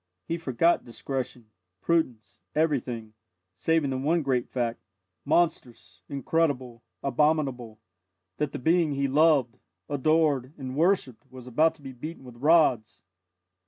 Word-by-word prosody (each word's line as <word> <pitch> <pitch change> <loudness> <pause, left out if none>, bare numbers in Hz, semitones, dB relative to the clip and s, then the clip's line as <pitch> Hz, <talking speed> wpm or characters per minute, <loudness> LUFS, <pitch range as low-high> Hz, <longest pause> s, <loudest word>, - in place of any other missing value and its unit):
He 165 +1 -3
forgot 165 +3 +2
discretion, 120 -2 -5 0.3
prudence, 130 - -1 0.2
everything, 125 -8 -1 0.4
saving 145 - +1
the 130 - -2
one 160 +4 +1
great 130 -3 0
fact 120 -2 -2 0.5
monstrous, 140 - -1
incredible, 135 -4 -1 0.2
abominable 135 -5 0 0.6
that 150 -2 -1
the - - -4
being 165 +2 +2
he 140 0 0
loved, 140 -4 +3 0.3
adored, 145 -2 +1
and 130 -2 -6
worshipped 150 - +1
was 130 -1 -11
about 155 +7 +2
to 150 - -19
be 135 - -7
beaten 150 +5 -8
with 125 -2 -12
rods! 145 -6 +3
135 Hz, 125 wpm, -27 LUFS, 125-160 Hz, 0.6 s, loved